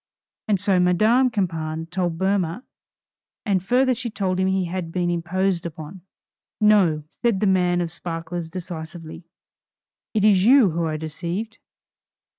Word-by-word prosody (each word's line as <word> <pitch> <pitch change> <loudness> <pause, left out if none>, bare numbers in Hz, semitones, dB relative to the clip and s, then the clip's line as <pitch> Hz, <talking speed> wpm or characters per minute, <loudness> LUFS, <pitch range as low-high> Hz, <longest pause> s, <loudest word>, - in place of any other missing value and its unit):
And 205 -3 +2
so 195 -1 +2
Madame 215 +9 +3
Campan 165 -7 -2
told 175 -2 -1
Boehmer, 190 +2 0 0.8
and 195 -4 +1
further 255 +6 +2
she 240 0 -4
told 185 -3 -2
him 190 - +2
he 190 -1 +1
had 175 -1 -4
been 175 0 0
imposed 175 +1 -1
upon. 165 +2 -8 0.6
"No," 195 -8 +4 0.2
said 235 -5 +2
the 210 - +1
man 180 -2 +2
of 170 -2 -3
sparklers 165 0 -5
decisively, 165 -1 -8 0.9
"It 210 -1 +3
is 195 -3 +5
you 240 -4 +6
who 165 +1 -1
are 155 -1 -2
deceived. 175 +8 -5
180 Hz, 140 wpm, -23 LUFS, 165-200 Hz, 0.9 s, you